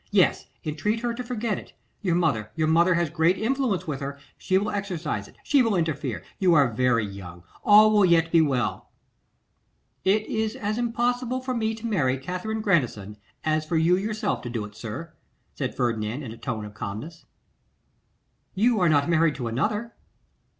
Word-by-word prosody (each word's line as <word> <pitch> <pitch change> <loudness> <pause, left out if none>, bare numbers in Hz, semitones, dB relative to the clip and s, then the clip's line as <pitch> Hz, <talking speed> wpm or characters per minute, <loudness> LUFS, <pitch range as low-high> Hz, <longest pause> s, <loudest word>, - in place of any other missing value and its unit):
Yes! 200 -3 +2 0.2
entreat 210 +9 -1
her 240 -1 -1
to 250 +2 -5
forget 235 -4 -2
it; - - -15 0.3
your 180 -5 +1
mother, 130 -12 0
your 155 -1 +1
mother 170 +3 +4
has 170 -3 0
great 170 +3 +2
influence 230 -5 0
with 150 -5 -3
her; 140 0 -5 0.2
she 185 - +1
will 205 +2 0
exercise 170 - -3
it, - - -19
she 285 -2 +4
will 225 -4 +2
interfere; 145 - -2 0.2
you 180 -3 +4
are 140 -6 +4
very 115 -1 +2
young, 90 -3 -9 0.2
all 215 +1 +7
will 210 -1 +5
yet 165 -2 +4
be 165 - +6
well.' 135 -6 -1 1.1
'It 210 +3 +2
is 220 0 -2
as 215 +2 -2
impossible 245 +1 0
for 255 0 -3
me 220 -2 -1
to 225 +1 -9
marry 145 - +1
Katherine 185 +10 -4
Grandison, 120 - 0 0.3
as 155 0 +1
for 160 +2 -1
you 165 +3 +4
yourself 215 +3 -2
to 120 - -6
do 115 -3 -3
it, 105 - -12
sir,' 115 +10 -7 0.4
said - - -4
Ferdinand, 115 +2 -1
in 120 - -6
a - - -8
tone 110 -2 -4
of 105 - -10
calmness. 110 +12 -7 1.3
'You 225 +3 +3
are 180 -2 +4
not 145 -2 +3
married 165 -2 +3
to 125 -4 -4
another? 210 - -1
170 Hz, 180 wpm, -25 LUFS, 130-215 Hz, 1.3 s, all